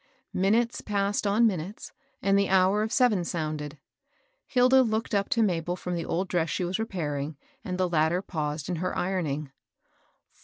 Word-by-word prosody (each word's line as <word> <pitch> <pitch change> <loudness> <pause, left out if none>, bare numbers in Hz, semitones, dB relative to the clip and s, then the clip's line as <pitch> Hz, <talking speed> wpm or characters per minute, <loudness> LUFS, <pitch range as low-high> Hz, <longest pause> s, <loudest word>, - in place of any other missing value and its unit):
Minutes 225 +5 +1
passed 205 0 0
on 215 +4 +4
minutes, 190 -1 -2 0.3
and 195 0 +3
the 200 0 +2
hour 190 +2 +4
of 220 +1 -1
seven 240 -7 +3
sounded. 155 -3 -4 0.7
Hilda 255 +1 +5
looked 225 -2 -1
up 200 -1 +1
to 235 -5 +3
Mabel 175 -3 0
from 180 0 -5
the 170 -2 -2
old 185 +3 -1
dress 170 -3 0
she 180 - -1
was 180 +4 -2
repairing, 155 -9 -3 0.3
and 185 -4 -3
the 185 -1 +1
latter 170 +2 +1
paused 150 -5 -3
in 175 -1 -2
her 185 +2 -2
ironing. 155 -6 -2
185 Hz, 165 wpm, -27 LUFS, 165-210 Hz, 0.7 s, Hilda